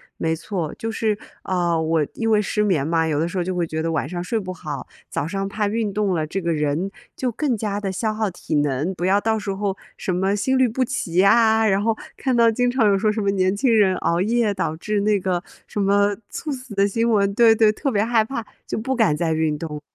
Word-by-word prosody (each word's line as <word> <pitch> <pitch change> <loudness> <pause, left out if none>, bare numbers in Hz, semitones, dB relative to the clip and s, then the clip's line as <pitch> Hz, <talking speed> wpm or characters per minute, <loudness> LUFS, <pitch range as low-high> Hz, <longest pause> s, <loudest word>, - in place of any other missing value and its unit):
没 160 0 -1
错， 170 -2 -4
就 225 0 -4
是， 215 -2 0 0.3
呃， 175 -3 0
我 160 -1 +1
因 225 -1 -1
为 215 -1 +4
失 210 +1 0
眠 160 -9 +1
嘛， 165 -1 +2
有 150 -2 0
的 165 - +1
时 175 - -7
候 180 - +1
就 185 +1 -3
会 175 - 0
觉 160 -1 -3
得 165 +1 -1
晚 150 -4 -1
上 175 +2 -4
睡 220 +5 -1
不 185 -2 -5
好， 150 -6 -6 0.2
早 145 - -2
上 195 +2 -2
怕 210 0 -1
运 215 0 -1
动 200 -1 0
了 160 -3 0
这 175 +5 -3
个 170 -2 -1
人 150 +5 -1 0.3
就 255 -2 -1
更 250 +1 -1
加 205 -1 -2
地 195 -2 -2
消 215 +3 -1
耗 215 -1 -1
体 175 -3 -4
能， 145 +4 0
不 175 - -6
要 195 +2 +4
到 220 +1 0
时 205 -1 -3
候 195 -1 -2 0.2
什 185 - -2
么 190 +2 +1
心 260 +6 0
律 260 -2 +4
不 255 +3 0
齐 170 -6 -4
呀， 220 +3 +5
然 195 0 +2
后 225 -1 +1 0.2
看 260 -2 -1
到 230 -1 +6
经 245 +2 +1
常 245 -4 +3
有 200 -1 +4
说 210 +2 +2
什 215 - -3
么 200 -1 +1
年 190 -1 +1
轻 235 +1 +3
人 195 -4 +4
熬 170 +1 0
夜 225 +1 +1
导 185 -5 -2
致 210 +4 -1
那 205 -1 +2
个 180 -1 -1 0.2
什 205 - -3
么 200 +1 +3
猝 305 - -5
死 255 -3 -8
的 200 0 +3
新 230 +3 0
闻。 200 -2 +2
对 230 +1 +6
对， 220 -1 +5
特 270 +5 -2
别 205 -1 +2
害 230 -1 +3
怕， 230 0 -5 0.2
就 - - -3
不 265 +4 -2
敢 215 -11 +2
再 160 0 0
运 155 -1 0
动， 150 -1 -6
200 Hz, 275 characters per minute, -22 LUFS, 170-220 Hz, 0.3 s, 到